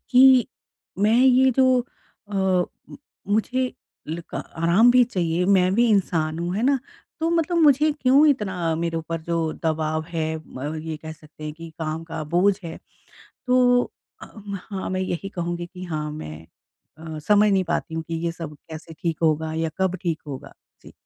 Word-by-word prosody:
कि 255 -1 +7 0.5
मैं 215 +3 +3
ये 260 0 +5
जो 255 0 +4 0.5
अ, 205 - -7
म 190 -2 +2 0.6
मुझे 250 +5 0 0.4
लक 165 +2 -6
आराम 175 +9 +3
भी 250 0 +6
चाहिए 175 -6 -1
मैं 185 -2 +4
भी 240 +2 +4
इंसान 165 -6 +1
हूँ 175 +2 -2
है 220 - -1
ना? 275 +1 +3 0.4
तो 325 - +1
मतलब 335 +1 +1
मुझे 300 0 +5
क्यों 270 +4 +5
इतना 190 - 0
मेरे 165 0 -2
ऊपर 165 0 -4
जो 170 +1 -2 0.3
दबाव 155 0 0
है 165 -2 -2 0.2
म 145 +4 -5
ये 160 -1 -4
कह 160 +1 -8
सकते 155 -1 -13
हैं 150 - -4
कि 165 0 -10
काम 160 0 -3
का 165 -1 -5
बोझ 195 +3 +4
है। 160 - -6 0.7
तो 250 -1 +4 0.4
अ, - - -8 0.4
हाँ 190 -2 -4
मैं 185 - -1
यही 185 +1 -3
कहूँगी 175 -2 -4
कि 180 +1 -10
हाँ 155 -3 -3
मैं 80 - -8 0.5
अ, 160 -1 -7
समझ 210 +6 +4
नहीं 190 -1 +2
पाती 165 -1 -2
हूँ 160 - -2
कि 165 - -3
ये 170 - -1
सब 165 -3 -7 0.2
कैसे 160 +1 -9
ठीक 165 -2 -2
होगा 160 0 +1
या 160 0 -1
कब 190 0 +1
ठीक 165 -3 -2
होगा? 135 -3 -8 0.3
जी। - - -14
175 Hz, 175 wpm, -23 LUFS, 160-225 Hz, 0.7 s, कि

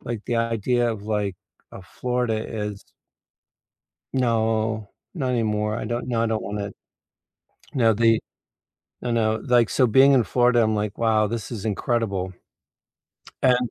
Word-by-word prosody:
like, 115 -3 -5
the 120 - 0
idea 115 +1 +1
of 100 -2 -8
like, 105 -3 -1 0.4
uh, - - -9
Florida 125 +3 -2
is 105 -2 -5 1.3
No, 110 -3 0 0.2
not 135 -7 -2
anymore. 105 -2 0
I - - -4
don't 120 +2 -3
no, 115 -2 0
I - - +2
don't 110 -3 -1
want 105 +1 -4
it. 100 0 -5 1.0
No, 115 -5 +4
the 115 +1 +3 0.8
No, 125 - -2
no, 110 -2 +2
like, 120 -4 +4
so 125 +5 +3
being 135 +5 +6
in 125 -3 +5
Florida, 120 0 +3
I'm 110 0 +1
like, 105 0 -2
"Wow, 110 -2 +3
this 115 +1 -5
is 110 -2 -5
incredible." 100 -3 -1 1.1
And 125 -2 +3
115 Hz, 150 wpm, -24 LUFS, 105-120 Hz, 1.3 s, being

